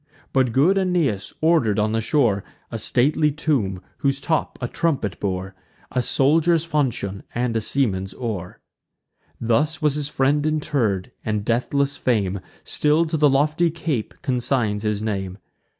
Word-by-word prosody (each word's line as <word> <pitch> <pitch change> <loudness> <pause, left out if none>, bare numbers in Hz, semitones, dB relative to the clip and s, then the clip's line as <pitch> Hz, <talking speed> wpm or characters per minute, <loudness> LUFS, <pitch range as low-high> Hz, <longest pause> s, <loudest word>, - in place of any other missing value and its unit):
But 130 -3 +3
good 165 +11 +4
Aeneas 170 - 0
order'd 155 -11 +3
on 105 0 +1
the 115 0 0
shore 110 -6 +2 0.3
A 115 - -3
stately 145 +7 +2
tomb, 120 - -1 0.2
whose 135 -2 +1
top 160 +3 -1
a 125 - -2
trumpet 130 - -1
bore, 95 -1 -3 0.4
A 125 - +1
soldier's 160 +6 +3
falchion, 125 - -1
and 120 -1 0
a 115 - +1
seaman's 95 -7 0
oar. 105 -8 -5 0.8
Thus 145 +8 +1
was 150 -4 +2
his 145 -1 -2
friend 145 +1 +1
interr'd; 140 -11 0
and 105 -2 -2
deathless 140 +4 0
fame 100 -6 0 0.2
Still 150 +3 +2
to 160 0 -2
the 150 -1 +4
lofty 150 +5 +2
cape 155 -8 -3
consigns 120 -5 0
his 105 -1 -1
name. 95 -3 -3
130 Hz, 145 wpm, -22 LUFS, 105-150 Hz, 0.8 s, good